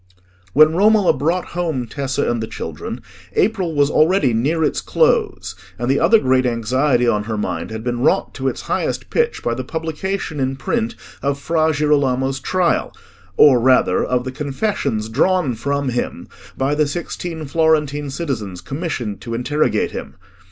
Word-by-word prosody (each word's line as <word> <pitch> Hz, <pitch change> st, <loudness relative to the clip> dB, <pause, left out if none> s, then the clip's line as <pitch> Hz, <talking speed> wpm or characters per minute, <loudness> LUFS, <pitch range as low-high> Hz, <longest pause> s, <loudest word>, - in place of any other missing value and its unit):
When 155 Hz, +2 st, +6 dB
Romola 205 Hz, +1 st, +4 dB
brought 170 Hz, +5 st, -1 dB
home 160 Hz, -8 st, -1 dB
Tessa 135 Hz, +2 st, -2 dB
and 120 Hz, -1 st, 0 dB
the 110 Hz, -, -3 dB
children, -, -, -6 dB, 0.3 s
April 190 Hz, -, +1 dB
was 145 Hz, 0 st, +3 dB
already 155 Hz, -5 st, +3 dB
near 150 Hz, +9 st, +1 dB
its 150 Hz, -, 0 dB
close, -, -, +1 dB, 0.2 s
and 120 Hz, +3 st, 0 dB
the 140 Hz, -, +2 dB
other 225 Hz, -, +5 dB
great 130 Hz, -8 st, +2 dB
anxiety 125 Hz, +2 st, +1 dB
on 105 Hz, -3 st, +1 dB
her 110 Hz, -1 st, -3 dB
mind 85 Hz, -5 st, -3 dB
had 110 Hz, 0 st, -6 dB
been 120 Hz, 0 st, -2 dB
wrought 125 Hz, -, +1 dB
to 135 Hz, 0 st, -3 dB
its -, -, -2 dB
highest -, -, -2 dB
pitch 470 Hz, 0 st, 0 dB
by 120 Hz, -, 0 dB
the 130 Hz, +2 st, -4 dB
publication 160 Hz, +2 st, -4 dB
in 135 Hz, 0 st, 0 dB
print 120 Hz, -3 st, -2 dB, 0.3 s
of 140 Hz, 0 st, 0 dB
Fra 160 Hz, +2 st, +1 dB
Girolamo's 135 Hz, -3 st, +1 dB
Trial, 180 Hz, +5 st, 0 dB, 0.5 s
or 135 Hz, -5 st, +7 dB
rather 130 Hz, +2 st, +3 dB
of 125 Hz, -1 st, 0 dB
the 130 Hz, -, -4 dB
confessions 140 Hz, -, -2 dB
drawn 150 Hz, +4 st, +1 dB
from 140 Hz, +4 st, -2 dB
him 120 Hz, 0 st, -3 dB, 0.3 s
by 135 Hz, +2 st, +1 dB
the 150 Hz, 0 st, +2 dB
sixteen 165 Hz, +1 st, -5 dB
Florentine 150 Hz, -1 st, +1 dB
citizens 120 Hz, -, -4 dB
commissioned 125 Hz, -, -4 dB
to 115 Hz, -1 st, -5 dB
interrogate 145 Hz, +6 st, 0 dB
him. -, -, -7 dB
140 Hz, 160 wpm, -19 LUFS, 125-160 Hz, 0.5 s, or